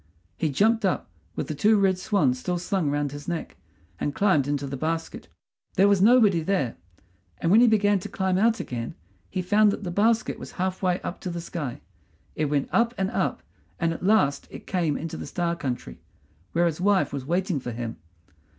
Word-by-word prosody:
He 155 - -1
jumped 220 +10 +2
up, 185 - -1 0.2
with - - -3
the - - -3
two 210 +9 +3
red 190 -2 +2
swans 145 -12 +1
still 180 +6 -2
slung 175 -2 -1
round 145 -1 -1
his 145 0 -9
neck, 170 -2 -4 0.4
and 145 - -2
climbed 185 -9 +3
into 145 -1 -1
the 135 0 -4
basket. 160 +4 -3 0.5
There 195 +2 +5
was 200 -2 +3
nobody 210 -5 +5
there; 155 - -1 0.6
and 165 - 0
when 220 +4 +7
he 245 - +6
began 205 -2 +3
to - - -7
climb 190 -1 0
out 225 +2 +3
again 115 -2 -5 0.3
he 185 - -3
found 210 +3 +4
that 205 - -5
the 180 - -3
basket 220 +5 +1
was - - -9
half 185 0 -2
way 180 -1 +1
up 175 - -6
to 185 - -4
the 170 0 -4
sky. 160 -7 -5 0.5
It 155 - 0
went 145 -1 0
up 235 +1 +2
and 190 0 -1
up, - - -1 0.4
and 165 -1 +1
at - - -8
last 180 -9 +2
it - - -10
came 170 -6 0
into 165 0 -5
the - - -6
Star 170 +3 -1
country, 125 - -5 0.5
where 170 +1 +3
his 170 0 -1
wife 200 -4 +2
was 140 -2 -3
waiting 175 -1 0
for 125 -1 -5
him. 115 0 -5
175 Hz, 205 wpm, -25 LUFS, 145-200 Hz, 0.6 s, when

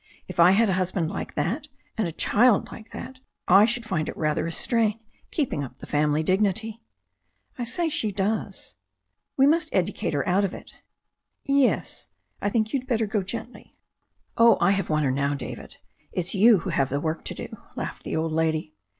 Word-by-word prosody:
If - - -8
I 170 +1 +8
had 225 +3 +4
a 190 - +1
husband 180 -2 -1
like - - -6
that 300 -1 -1 0.3
and 220 -4 0
a - - -4
child 215 +7 +3
like 225 0 -11
that 260 0 -8 0.3
I 195 +3 +7
should 240 0 -2
find 155 -7 -1
it - - -7
rather 155 +1 0
a - - -3
strain 225 +3 +1 0.3
keeping 260 - -1
up 130 -1 -9
the - - -10
family 150 +1 +1
dignity." 210 +5 0 0.8
"I 240 - -1
should 235 - -5
say 340 -2 +1
she 220 -8 -1
does." 200 - -3 0.6
"We 270 - +6
must 315 +2 +3
educate 175 -4 -1
her 140 - -1
out 190 +3 +3
of 195 - -1
it" - - -13 0.6
"Yes? 275 -2 +1 0.3
I 205 - +1
think 220 0 +1
ypu'd 260 -2 -1
better 230 -3 +1
go 210 0 -1
gently." 230 +6 -7 0.6
"Oh, 230 0 +6
I - - +4
have 195 -2 -1
won 155 -1 +1
her 135 - +2
now, 140 +2 0
David. 140 - -8 0.3
It's 180 +1 -3
you 210 -1 +6
who 190 - -3
have 135 -4 +1
the 140 - -1
work 155 +2 -3
to - - -4
do," - - -7 0.2
laughed - - -5
the - - -3
old 160 0 -1
lady. 160 -1 0
195 Hz, 195 wpm, -25 LUFS, 160-230 Hz, 0.8 s, I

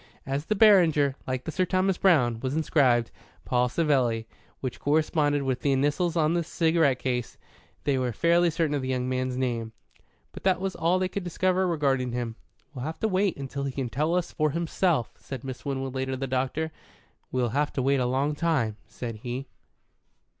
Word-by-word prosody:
As 140 +2 -2
the 215 - 0
Beranger, 170 -10 +5
like 130 -1 -2
the - - -4
Sir 185 - +1
Thomas 185 +1 +1
Browne, 125 -12 +3
was 130 +3 -2
inscribed 130 -7 +2 0.3
"Paul 125 0 +2
Savelli," 125 -7 +1 0.3
which 130 -2 -5
corresponded 145 -1 +1
with 130 -1 -1
the 140 - +1
initials 145 +6 +1
on 155 0 +3
the 170 -1 +1
cigarette 160 -4 +2
case, 125 -2 -3 0.5
they 140 -2 +1
were 125 -1 0
fairly 170 +8 +3
certain 160 -2 0
of 145 - 0
the 130 - -4
young 130 -1 -1
man's 130 0 -1
name. 115 -3 -2 0.6
But - - -10
that 190 -1 +2
was 190 0 -3
all 170 +2 +2
they 185 0 0
could 195 +1 -4
discover 185 +1 +1
regarding 135 -7 0
him. 120 -2 -3 0.4
"We'll 125 -3 -6
have 160 +1 -5
to 220 - +2
wait 195 -2 +1
until 140 0 -5
he 135 - -2
can 130 -2 -3
tell 155 +7 0
us 180 -2 -1
himself," 160 - 0
said 130 -3 -7
Miss 130 -2 -7
Winwood 135 -2 -3
later 130 0 -2
to - - -3
the 135 - -2
doctor. 135 +5 -1 0.6
"We'll 125 -2 0
have 145 +5 0
to 130 - -1
wait 140 +1 +3
a 125 - +1
long 135 +4 +1
time," 145 -9 0
said 115 -3 -6
he. 125 +4 -5
140 Hz, 190 wpm, -27 LUFS, 130-165 Hz, 0.6 s, Beranger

